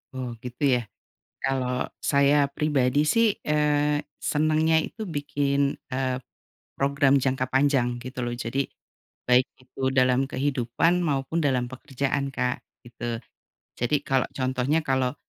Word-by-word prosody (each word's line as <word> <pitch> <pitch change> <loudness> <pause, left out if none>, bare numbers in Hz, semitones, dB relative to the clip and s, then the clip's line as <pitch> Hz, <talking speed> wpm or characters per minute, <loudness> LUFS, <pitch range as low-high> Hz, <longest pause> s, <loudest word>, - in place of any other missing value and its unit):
Oh 125 -2 -5
gitu 125 +3 -6
ya. 120 - 0 0.6
Kalau 130 -2 -1
saya 140 +1 +3
pribadi 145 -2 +2
sih, 215 +7 +3
eee, 150 -1 +2 0.2
senengnya 155 +1 +2
itu 200 +7 -4
bikin, 145 -5 0 0.2
eee, 130 0 -1 0.6
program 140 0 +3
jangka 130 -1 -1
panjang 130 -3 +2
gitu 130 0 -5
loh, 120 - -1
jadi 125 +3 -2 0.6
baik 125 +1 +5 0.2
itu 130 +1 -12
dalam 130 0 +3
kehidupan 135 +6 +1
maupun 140 +1 -1
dalam 130 -4 +1
pekerjaan, 135 +2 -2
Kak, 125 0 -1 0.2
gitu. 120 -1 -5 0.6
Jadi 125 +5 +1
kalau 135 -3 +1
contohnya 130 +4 0
kalau 130 -1 +1
135 Hz, 120 wpm, -26 LUFS, 125-145 Hz, 0.6 s, baik